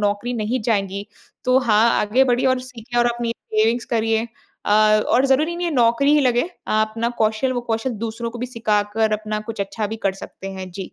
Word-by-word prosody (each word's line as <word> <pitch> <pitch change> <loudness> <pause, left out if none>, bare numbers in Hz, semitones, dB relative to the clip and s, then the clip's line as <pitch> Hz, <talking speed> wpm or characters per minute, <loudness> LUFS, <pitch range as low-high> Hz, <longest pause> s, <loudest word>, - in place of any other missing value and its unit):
नौकरी 205 +4 -1
नहीं 240 +5 -1
जाएँगी, 200 -3 -1 0.4
तो 255 +1 +4
हाँ 230 -2 +3
आगे 240 +6 +3
बढ़िए 250 0 +1
और 260 0 +3
सीखें 240 -1 -6
और 240 - +3
अपनी 235 -1 -2 0.2
सेविंग्स 225 +2 +2
करिए 225 0 +1 0.4
अ, - - 0 0.4
और 255 +3 +3
ज़रूरी 305 +6 +2
नहीं 350 0 -2
है 335 - -1
नौकरी 245 +4 +3
ही 300 - +4
लगे, 255 +5 +1 0.2
आप 215 0 +1
ना 230 +1 +1
कौशल 220 +4 +1
वो 245 - -1
कौशल 225 +3 -1
दूसरों 230 +1 -4
को 240 - -8
भी 250 - -3
सिखाकर 220 -2 0
अपना 215 0 -2
कुछ 220 - -6
अच्छा 200 +2 -4
भी 220 - -4
कर 195 - +2
सकते 195 - -9
हैं, 190 -1 -7
जी। 190 +1 -7
230 Hz, 210 wpm, -21 LUFS, 215-250 Hz, 0.4 s, तो